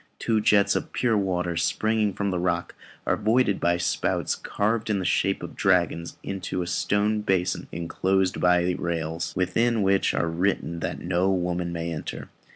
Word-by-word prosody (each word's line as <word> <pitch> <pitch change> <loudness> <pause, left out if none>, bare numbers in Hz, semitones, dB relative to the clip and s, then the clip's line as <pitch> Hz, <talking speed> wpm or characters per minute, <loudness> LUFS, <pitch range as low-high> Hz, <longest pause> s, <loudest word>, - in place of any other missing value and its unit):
Two 110 -2 +1
jets 105 -2 +4
of - - -3
pure 120 -3 +1
water 90 -4 0
springing 105 +5 +1
from 100 +1 -2
the 90 - -1
rock 85 -1 -1 0.3
are - - +2
voided 110 -1 +2
by 85 0 +2
spouts 85 0 0
carved 110 +2 -1
in 105 - +1
the 95 - -3
shape 95 +2 +1
of - - -7
dragons 85 -3 +1
into 95 -2 -3
a - - -5
stone 105 +4 0
basin 95 -3 0
enclosed 95 +2 0
by 90 0 +3
rails, 80 -1 -2
within 110 +5 +1
which 95 0 +2
it - - -2
is - - +2
written 85 0 -1
that - - -4
"no 90 +2 +1
woman 90 -1 -1
may 85 0 -3
enter." 75 - -6
95 Hz, 170 wpm, -25 LUFS, 85-100 Hz, 0.3 s, jets